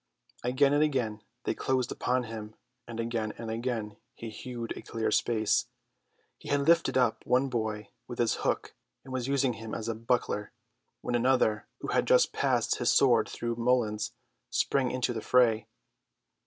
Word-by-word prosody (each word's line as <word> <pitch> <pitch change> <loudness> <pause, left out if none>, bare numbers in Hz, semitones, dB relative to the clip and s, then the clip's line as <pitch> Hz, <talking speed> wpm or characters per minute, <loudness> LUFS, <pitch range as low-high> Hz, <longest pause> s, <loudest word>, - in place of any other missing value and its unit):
Again 130 +3 +3
and 145 - +3
again 125 -8 0 0.2
they - - 0
closed 130 -2 0
upon 125 0 0
him, 110 -2 -7 0.3
and 115 -1 -6
again 115 -2 -2
and 115 -1 -5
again 115 -3 -3 0.2
he 115 -1 -7
hewed 120 +1 -6
a - - -7
clear 115 -1 -2
space. 110 -3 +2 0.7
He - - -10
had 145 0 +2
lifted 165 0 +3
up 125 -3 +2
one 130 +2 +2
boy 110 -4 -2 0.2
with 120 - -7
his 120 -2 +1
hook, - - -1 0.3
and 130 - -9
was 130 -1 -2
using 135 -2 +2
him 115 -1 -6
as 115 - -4
a 115 - 0
buckler, 115 -2 -1 0.5
when - - -3
another, 120 -3 +2
who - - -4
had - - +1
just - - +4
passed - - +1
his - - +2
sword 120 -5 +4
through 120 -1 -3
Mullins, 115 -3 +1 0.4
sprang 130 -2 +1
into 125 -1 -1
the 110 - -4
fray. 120 -3 +3
120 Hz, 170 wpm, -29 LUFS, 110-130 Hz, 0.7 s, just